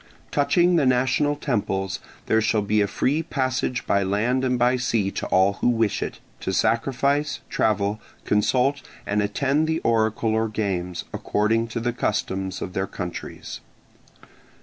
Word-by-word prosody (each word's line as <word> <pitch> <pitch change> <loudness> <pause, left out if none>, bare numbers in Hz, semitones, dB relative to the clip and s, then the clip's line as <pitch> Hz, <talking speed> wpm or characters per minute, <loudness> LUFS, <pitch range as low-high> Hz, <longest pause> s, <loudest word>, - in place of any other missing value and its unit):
Touching 170 +5 +3
the 150 - +3
national 130 +4 +2
temples, 100 -9 -2 0.3
there 110 - +3
shall 110 -1 +1
be 105 +1 +2
a 100 - +2
free 145 +9 0
passage 130 -5 -1
by 100 - +2
land 110 +7 +1
and 125 -1 +1
by 125 +1 +3
sea 115 -5 0
to - - -4
all 95 +2 +3
who - - +2
wish 115 -3 +1
it, - - -4 0.2
to - - -3
sacrifice, 140 +5 +1
travel, 105 0 +1 0.2
consult, 125 +7 +2 0.2
and 105 +1 +1
attend 140 +9 +1
the 160 0 +1
oracle 110 -1 +1
or 110 0 +1
games, 90 -5 -2
according 115 +2 +1
to 115 +1 -4
the 120 +1 -1
customs 95 -4 -2
of 90 - -6
their 95 +1 -1
countries. 90 -2 -6
115 Hz, 150 wpm, -24 LUFS, 100-130 Hz, 0.3 s, Touching